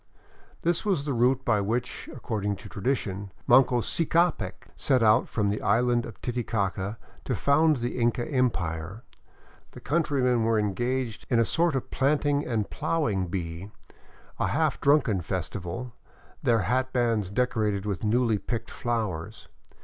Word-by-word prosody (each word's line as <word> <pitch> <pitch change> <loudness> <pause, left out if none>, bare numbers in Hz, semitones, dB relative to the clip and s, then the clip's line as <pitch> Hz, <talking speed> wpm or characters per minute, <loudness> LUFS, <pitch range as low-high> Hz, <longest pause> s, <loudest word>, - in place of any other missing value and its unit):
This 170 0 +1
was 190 -9 0
the 145 - -1
route 125 +2 +2
by 105 - +2
which, 120 +5 -3
according 105 -5 -3
to - - -11
tradition, 100 -4 -2
Manco 125 -1 +5
Ccapac 165 - 0
set 130 -4 +2
out 110 +3 +4
from 105 -3 0
the 105 - -3
island 120 +2 +2
of 115 - -11
Titi 120 -1 -2
caca 100 -1 -2 0.3
to 125 - -1
found 150 - +3
the 120 0 -3
Inca 120 0 +1
Empire. 95 - -1 0.7
The - - -10
countrymen 135 -6 +1
were 115 0 +2
engaged 120 +3 -1
in 120 - +3
a 115 - +4
sort 165 +2 +1
of 130 - -3
planting 145 +1 +1
and 110 -4 -1
plowing 105 - 0
bee, 85 +1 -5 0.7
a - - +1
half - - 0
drunken 135 -10 +3
festival, 95 +6 -4 0.5
their 115 -3 +3
hatbands 120 -2 0
decorated 105 -4 0
with 100 -5 -3
newly 115 0 +2
picked 115 +2 -4
flowers. 110 -5 -3
115 Hz, 140 wpm, -27 LUFS, 100-130 Hz, 0.7 s, Manco